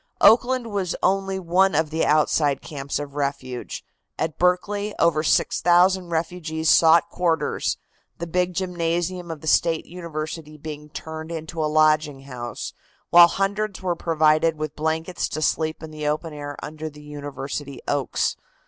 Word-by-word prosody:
Oakland 245 0 +4
was 195 -3 -1
only 195 0 +1
one 185 0 +2
of 155 0 +1
the 160 +1 0
outside 150 -2 +2
camps 140 -2 -4
of 145 -1 -6
refuge. 140 -3 -4 0.3
At 160 -1 -3
Berkeley 200 +4 +1
over 165 -2 +3
6,000 180 +3 +3
refugees 160 -1 -1
sought 165 +1 +6
quarters, 165 -4 0 0.4
the 170 - -4
big 180 +1 0
gymnasium 175 0 -2
of 160 -3 -6
the 155 - -8
State 165 +1 +2
University 160 -2 -6
being 150 0 -8
turned 160 +1 -7
into 160 0 -4
a 150 - +1
lodging 155 -2 +3
house, 125 -3 -6 0.4
while 175 0 +10
hundreds 195 +2 -2
were 180 -2 0
provided 160 -1 +2
with 155 -1 -4
blankets 160 +3 -2
to - - -4
sleep 160 +1 0
in 160 - -7
the 150 -1 -4
open 155 +2 -2
air 145 -1 -6
under 155 +1 -6
the 150 0 -14
University 145 -2 -6
oaks. 145 -3 0
160 Hz, 150 wpm, -23 LUFS, 150-175 Hz, 0.4 s, while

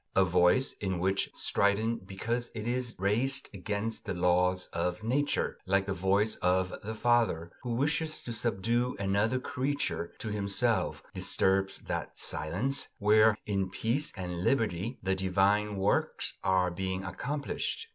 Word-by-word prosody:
A 95 - +5
voice 90 +8 +3
which 95 0 0
is - - -24
strident 105 +1 +1
because 115 +5 -2
it 110 -1 -4
is 120 0 -1
raised 110 +8 0
against 105 +3 -3
the - - -3
laws 90 +1 +2
of 90 +4 -2
Nature, 140 +6 0
like 100 +1 +2
the 100 - -1
voice 100 +4 +1
of 90 +1 +1
the 110 +2 -5
father 115 -9 +2
who 120 -2 -2
wishes 150 +4 0
to 120 - -5
subdue 115 +2 0
another 100 +5 +1
creature 130 - -2
to 110 - -5
himself, 100 -2 0
disturbs 95 0 +1
that - - -4
"silence" 100 - 0
where, 110 +1 +5
in 100 -2 -1
peace 120 +10 -1
and 90 -1 -4
liberty, 115 -2 0
the 95 0 +1
divine 100 +3 +2
works 100 +1 0
are 90 -1 +2
being 95 +1 -3
accomplished. 140 - -3
100 Hz, 140 wpm, -30 LUFS, 95-115 Hz, -, A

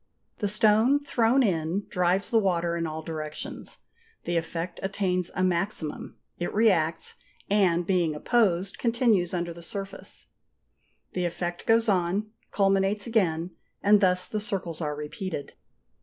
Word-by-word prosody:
The 205 - 0
stone 220 +7 +4
thrown 250 0 +3
in 175 -1 0
drives 180 +1 +1
the 225 - +5
water 175 -4 +1
in 165 -1 -1
all 160 0 -5
directions; 155 -2 -6 0.5
the 175 - -2
effect 165 +1 -3
attains 185 -2 -1
a 185 - +1
maximum, 175 -3 -2 0.2
it 175 - -2
reacts, 170 -7 +2 0.4
and 180 -4 +3
being 175 -4 +1
opposed, 195 0 +1
continues 230 -7 +2
under 175 -1 -2
the 170 - -11
surface. 195 +3 -7 0.9
The 180 -1 -1
effect 175 0 -4
goes 225 0 +4
on, 195 +2 +1 0.2
culminates 195 +1 +2
again, 180 -7 +1 0.3
and 205 +1 +6
thus 180 -1 +3
the 215 - -2
circles 195 -7 -4
are 150 -2 -2
repeated. 150 +1 -5
185 Hz, 135 wpm, -27 LUFS, 170-210 Hz, 0.9 s, and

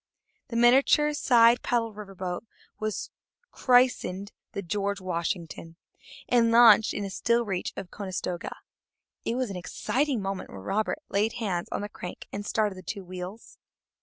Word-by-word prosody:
The 235 - -7
miniature 270 +5 +5
side 240 -4 +5
paddle 230 -2 0
river 205 -2 -10
boat 180 -1 -4 0.4
was 215 -1 -3 0.4
christened 245 -6 +2 0.2
the 200 - -4
George 200 +2 -2
Washington, 170 -2 -4 0.5
and 235 -2 +4
launched 230 -2 +7
in 205 - -2
a 195 - -5
still 235 +4 +1
reach 190 -3 -2
of - - -4
the - - -30
Conestoga. 185 -3 -4 0.7
It 230 - 0
was 255 -4 -1
an 190 - -5
exciting 260 +8 -1
moment 195 -1 -4
when - - -9
Robert 215 - -1
laid 210 +3 +1
hands 190 -7 -2
on - - -2
the 205 - -3
crank 180 -3 -8
and 205 - -4
started 210 -1 0
the - - -9
two 195 +2 -6
wheels. 185 +4 -8
205 Hz, 160 wpm, -27 LUFS, 185-235 Hz, 0.7 s, launched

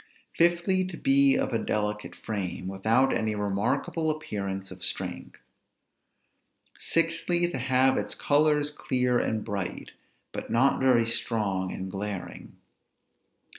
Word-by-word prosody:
Fifthly, 175 +2 +3
to 180 -2 -7
be 135 0 +4
of - - -1
a 115 - +1
delicate 105 0 -2
frame, 95 -4 -4
without 110 +8 +2
any 110 -1 -1
remarkable 105 +10 -1
appearance 100 -11 -4
of 90 -1 -8
strength. - - -2 1.4
Sixthly, 165 +1 +1
to 135 - -3
have 130 +1 +3
its - - -2
colors 150 0 +2
clear 125 -4 0
and 110 -1 -1
bright, 100 -4 -4 0.4
but - - -6
not 130 +4 +3
very 125 -3 +4
strong 105 -5 -1
and 95 0 -6
glaring. 100 -1 -6
115 Hz, 120 wpm, -27 LUFS, 100-145 Hz, 1.4 s, be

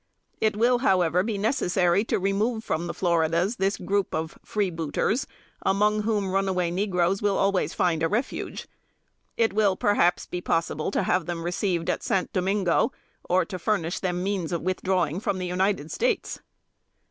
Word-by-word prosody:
It 215 -1 +1
will, 240 +2 +3
however, 180 -7 +3
be 210 +1 -2
necessary 190 -4 +2
to - - 0
remove 210 +4 0
from 170 -4 -2
the - - -3
Floridas 170 +4 +1
this 195 +1 0
group 200 0 -1
of 160 0 -3
freebooters, 195 - -1 0.4
among 210 +2 +2
whom 210 -3 0
runaway 190 -3 0
negroes 185 0 0
will 205 -1 +1
always 195 -1 +1
find 170 -3 +1
a 165 - +3
refuge. 225 +9 -3 0.7
It 225 -3 +2
will, 205 -2 +3
perhaps, 185 -3 +2
be 180 - -5
possible 165 -2 -1
to 200 - 0
have 180 -1 +1
them 170 -1 -3
received 175 -1 -1
at - - 0
St. 190 -2 -1
Domingo, 190 -1 +1 0.4
or 185 +1 +3
to 185 -3 -6
furnish 175 -3 -1
them 180 -1 -2
means 190 -4 -2
of 170 -2 -2
withdrawing 185 -2 0
from 200 -2 -1
the 185 - -3
United 180 -3 0
States!" 475 -3 -1
190 Hz, 160 wpm, -26 LUFS, 175-205 Hz, 0.7 s, will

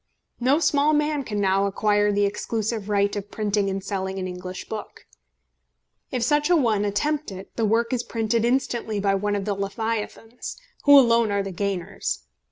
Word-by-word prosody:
No 260 +4 +3
small 300 -2 +3
man 300 -1 +1
can 210 -4 -3
now 195 0 +2
acquire 205 +1 +2
the 205 0 +2
exclusive 215 +1 -2
right 200 0 +2
of 205 0 -5
printing 205 -2 0
and 195 0 -3
selling 190 -1 -3
an 185 -1 -3
English 185 0 -7
book. 215 -1 -7 1.0
If 250 -2 -1
such 295 +5 +2
a 355 - +5
one 220 -9 +2
attempt 295 +8 -1
it, 190 0 -10
the 225 - +1
work 230 +3 +1
is 245 - +1
printed 230 -1 -1
instantly 235 -3 0
by 200 0 +2
one 205 +1 0
of 200 -1 -2
the 210 - 0
leviathans, 220 +3 -4 0.3
who 285 -1 +9
alone 235 -4 +5
are 200 0 0
the 195 - -5
gainers. 185 - -3
210 Hz, 175 wpm, -24 LUFS, 200-235 Hz, 1.0 s, who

